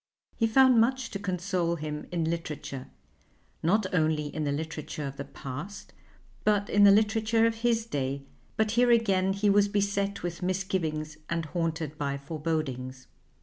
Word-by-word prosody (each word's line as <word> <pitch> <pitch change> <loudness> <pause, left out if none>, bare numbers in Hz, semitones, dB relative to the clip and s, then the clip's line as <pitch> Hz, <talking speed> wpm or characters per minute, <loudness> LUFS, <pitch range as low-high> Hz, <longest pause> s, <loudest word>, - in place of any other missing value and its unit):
He 225 - +2
found 255 0 +6
much 260 +1 0
to 200 - -4
console 180 -3 -1
him 150 -1 -5
in 170 -2 0
literature, 155 -5 -4 0.7
not 200 +6 +2
only 155 -3 +1
in 155 -1 -2
the 145 - 0
literature 155 0 -4
of 140 0 -6
the 140 - -4
past 150 +10 -8 0.5
but 205 -1 +2
in 205 0 +6
the - - +9
literature 220 +2 +3
of 230 0 +1
his 230 -1 +1
day, 140 - -2 0.3
but 220 -1 +2
here 240 +2 +3
again 195 -5 +3
he 200 +2 0
was 205 0 +5
beset 200 -1 -1
with 175 0 -4
misgivings 175 -5 -2
and 170 -1 -1
haunted 160 -1 -3
by 140 -1 -1
forebodings. 140 -4 -3
175 Hz, 155 wpm, -28 LUFS, 155-205 Hz, 0.7 s, the